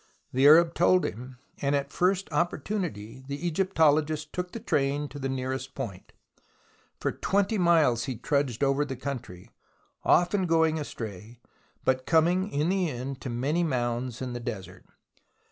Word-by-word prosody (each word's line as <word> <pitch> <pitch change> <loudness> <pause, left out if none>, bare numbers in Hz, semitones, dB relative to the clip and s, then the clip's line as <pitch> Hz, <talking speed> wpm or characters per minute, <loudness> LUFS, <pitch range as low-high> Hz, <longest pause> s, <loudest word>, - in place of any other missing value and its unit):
The 135 +2 +5
Arab 165 +2 +7
told 180 +1 +3
him, 125 +4 -6 0.2
and 140 0 +1
at 140 -1 -1
the - - -16
first 190 +1 +2
opportunity 150 - -2
the 140 +4 -5
Egyptologist 155 -4 +1
took 180 0 -3
the 230 - -6
train 145 -4 0
to 145 - -9
the 135 -1 -2
nearest 130 0 -4
point. 110 -9 -6 0.9
For - - 0
20 200 +2 0
miles 155 -10 +3
he 130 -2 -3
trudged 140 0 -1
over 135 +1 +2
the 135 -2 -5
country, 120 -9 -7 0.5
often 180 +2 +3
going 160 -1 +3
astray, 115 -4 -7 0.5
but 130 0 +1
coming 175 +4 +3
in 150 +4 0
the 185 -3 +1
end 130 +1 -5
to 130 - -5
many 140 +9 0
mounds 125 -3 -2
in 125 -1 -4
the 120 - -4
desert. 105 -5 -7
145 Hz, 155 wpm, -27 LUFS, 125-170 Hz, 0.9 s, Arab